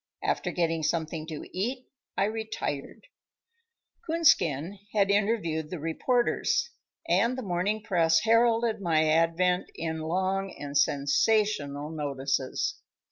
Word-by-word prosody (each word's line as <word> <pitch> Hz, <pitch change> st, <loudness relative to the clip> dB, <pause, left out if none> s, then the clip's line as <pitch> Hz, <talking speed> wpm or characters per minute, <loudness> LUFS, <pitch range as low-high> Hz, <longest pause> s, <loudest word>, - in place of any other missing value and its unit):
After -, -, 0 dB
getting 165 Hz, -2 st, 0 dB
something 160 Hz, 0 st, -2 dB
to 155 Hz, -2 st, -6 dB
eat 250 Hz, +7 st, -2 dB, 0.3 s
I -, -, +3 dB
retired. 215 Hz, -, -4 dB, 1.0 s
Coonskin 205 Hz, -, +2 dB
had 200 Hz, -2 st, +3 dB
interviewed 200 Hz, -7 st, 0 dB
the 180 Hz, -, -5 dB
reporters, 240 Hz, -, 0 dB, 0.4 s
and 245 Hz, +2 st, +2 dB
the 260 Hz, -, -4 dB
morning 200 Hz, +3 st, -1 dB
press 165 Hz, -6 st, +3 dB
heralded 230 Hz, -1 st, +3 dB
my 160 Hz, -3 st, +2 dB
advent 165 Hz, +3 st, +2 dB
in 160 Hz, -1 st, -3 dB
long 190 Hz, +4 st, -1 dB
and 145 Hz, 0 st, -7 dB
sensational 145 Hz, +1 st, +1 dB
notices. 140 Hz, -3 st, -2 dB
175 Hz, 110 wpm, -28 LUFS, 155-215 Hz, 1.0 s, I